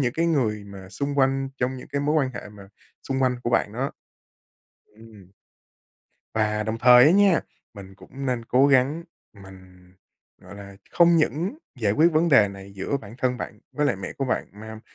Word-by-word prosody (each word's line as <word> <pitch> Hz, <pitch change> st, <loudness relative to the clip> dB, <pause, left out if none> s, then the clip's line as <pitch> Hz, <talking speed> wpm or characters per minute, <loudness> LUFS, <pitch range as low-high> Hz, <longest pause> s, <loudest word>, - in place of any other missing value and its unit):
những 125 Hz, -3 st, 0 dB
cái 165 Hz, +3 st, 0 dB
người 115 Hz, -10 st, 0 dB
mà 100 Hz, -2 st, -11 dB
xung 140 Hz, +8 st, -4 dB
quanh, 135 Hz, 0 st, +1 dB
trong 130 Hz, +1 st, -1 dB
những 125 Hz, -, -11 dB
cái 140 Hz, -, -2 dB
mối 150 Hz, +2 st, 0 dB
quan 135 Hz, -4 st, +1 dB
hệ -, -, -8 dB
mà 100 Hz, -2 st, -14 dB, 0.4 s
xung 135 Hz, 0 st, -1 dB
quanh 125 Hz, -1 st, +1 dB
của 120 Hz, -, -1 dB
bạn 105 Hz, -3 st, +1 dB
đó. 135 Hz, +4 st, -3 dB, 1.1 s
Ừm. 110 Hz, -4 st, -17 dB, 1.0 s
Và 105 Hz, -1 st, 0 dB
đồng 110 Hz, +2 st, -4 dB
thời 125 Hz, +1 st, +7 dB
á 155 Hz, -, +6 dB
nha, 195 Hz, -3 st, +4 dB, 0.3 s
mình 95 Hz, -1 st, -12 dB
cũng 135 Hz, +7 st, -9 dB
nên 125 Hz, -3 st, -2 dB
cố 130 Hz, +4 st, +3 dB
gắng, 140 Hz, +5 st, +2 dB, 0.4 s
mình, 95 Hz, -1 st, -16 dB, 0.5 s
gọi -, -, -12 dB
là, 100 Hz, -1 st, -11 dB
không 170 Hz, 0 st, +4 dB
những 170 Hz, -, -1 dB, 0.2 s
giải 100 Hz, -2 st, +1 dB
quyết 160 Hz, +6 st, +3 dB
vấn 165 Hz, +2 st, +2 dB
đề 110 Hz, -8 st, +5 dB
này 100 Hz, 0 st, -11 dB
giữa 100 Hz, +9 st, -2 dB
bản 110 Hz, -4 st, -11 dB
thân 125 Hz, -1 st, 0 dB
bạn -, -, -8 dB
với 150 Hz, 0 st, 0 dB
lại 100 Hz, -, 0 dB
mẹ 95 Hz, -, -7 dB
của 135 Hz, -, -4 dB
bạn, 125 Hz, -, -2 dB
mà 110 Hz, +1 st, -10 dB
125 Hz, 195 wpm, -24 LUFS, 100-140 Hz, 1.1 s, thời